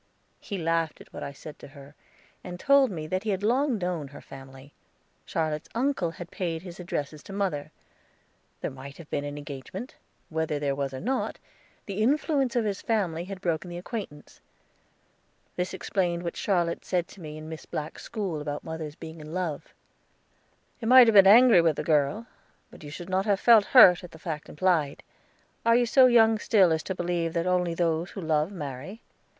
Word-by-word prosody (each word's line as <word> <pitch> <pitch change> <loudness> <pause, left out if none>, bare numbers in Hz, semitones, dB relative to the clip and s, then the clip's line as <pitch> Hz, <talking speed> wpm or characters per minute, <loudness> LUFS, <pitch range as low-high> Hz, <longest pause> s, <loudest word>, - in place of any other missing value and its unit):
He 200 - -6
laughed 165 -2 -1
at - - -16
what - - -7
I - - -5
said 145 +1 -11
to - - -11
her, 140 0 -14 0.5
and 180 -1 -7
told 280 +2 +4
me 160 -6 -5
that 185 +4 -2
he 220 - -4
had 195 -1 -1
long 255 +3 +2
known 175 -6 -3
her 145 +1 -12
family. 135 +1 -13 0.5
Charlotte's 155 -1 -2
uncle 245 -8 0
had 170 +2 -10
paid 170 -3 -3
his 180 -1 -10
addresses 150 -4 -4
to - - -12
mother. 195 -8 -2 0.9
There - - -3
might 135 +1 -10
have 165 -3 -13
been 145 - -1
an 145 0 -6
engagement; 145 - -8 0.3
whether 160 -2 -1
there 145 -1 -1
was 140 -1 -3
or 130 - -6
not, 260 - -2 0.5
the 200 +1 -4
influence 275 0 +1
of 235 -2 +1
his 200 -2 -2
family 180 -7 -1
had 190 0 -8
broken 175 0 -2
the 175 - -6
acquaintance. 180 -5 -8 1.1
This 180 +1 -2
explained 180 -3 -1
what 170 - -4
Charlotte 175 -4 0
said 180 -2 -1
to 195 - -14
me 155 -1 -8
in 155 0 -9
Miss 160 0 -9
Black's 155 +1 -5
school 195 -9 -4
about 145 0 -5
mother's 160 -2 -6
being 160 -1 -10
in 155 +3 -8
love. 170 -6 -3 1.1
"You 225 - -4
might 255 +1 +9
have 225 - +3
been 195 -2 +8
angry 230 -2 +8
with 165 -2 +2
the 150 - -3
girl, 150 +7 +1 0.5
but - - -14
you 145 - -8
should 170 +4 -8
not 190 +2 0
have 200 -2 +2
felt 225 -4 +6
hurt 185 -10 +7
at 180 - -9
the - - -11
fact 155 -1 -6
implied. 160 -4 0 0.6
Are 230 0 +4
you 245 0 +4
so 255 +2 +6
young 225 -2 +5
still 195 -6 +4
as 160 - -1
to 190 - -3
believe 170 -2 -2
that 170 0 -1
only 180 -2 +1
those 165 0 0
who 195 - -7
love 155 +1 0
marry? 150 - -7
175 Hz, 195 wpm, -27 LUFS, 155-200 Hz, 1.1 s, might